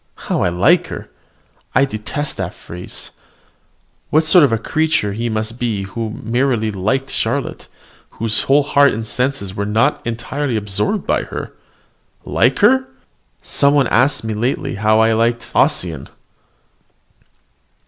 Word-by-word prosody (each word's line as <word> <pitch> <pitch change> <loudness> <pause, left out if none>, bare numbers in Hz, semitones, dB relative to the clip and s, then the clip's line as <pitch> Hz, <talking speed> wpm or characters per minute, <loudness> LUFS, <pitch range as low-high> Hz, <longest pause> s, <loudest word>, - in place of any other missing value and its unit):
How - - +1
I - - +2
like 155 - +3
her! - - -8 0.6
I 135 +3 +5
detest 140 +4 -4
the 95 -2 -2
phrase. 90 0 -9 1.0
What 155 +2 +3
sort 165 +1 +6
of 115 -6 +1
creature 155 -10 0 0.2
must 110 0 -2
he 115 - -13
be 115 -5 -2
who 110 +3 -4
merely 115 -1 0
liked 110 +8 -1
Charlotte, 130 +5 -2 0.5
whose 110 -1 +1
whole 145 +2 +5
heart 140 0 +4
and 110 0 -4
senses 125 -5 -2
were 100 +1 -3
not 115 +8 +1
entirely 120 +3 -3
absorbed 105 - -1
by - - 0
her. - - -7 0.7
Like - - +2
her! 260 +3 +4 0.6
Some 140 0 +3
one 140 -2 +4
asked 135 +3 +2
me 110 -1 -3
lately 120 +5 -2
how 110 +2 +2
I 110 0 +4
liked 115 +1 0
Ossian. 80 -6 0
115 Hz, 140 wpm, -18 LUFS, 105-140 Hz, 1.0 s, sort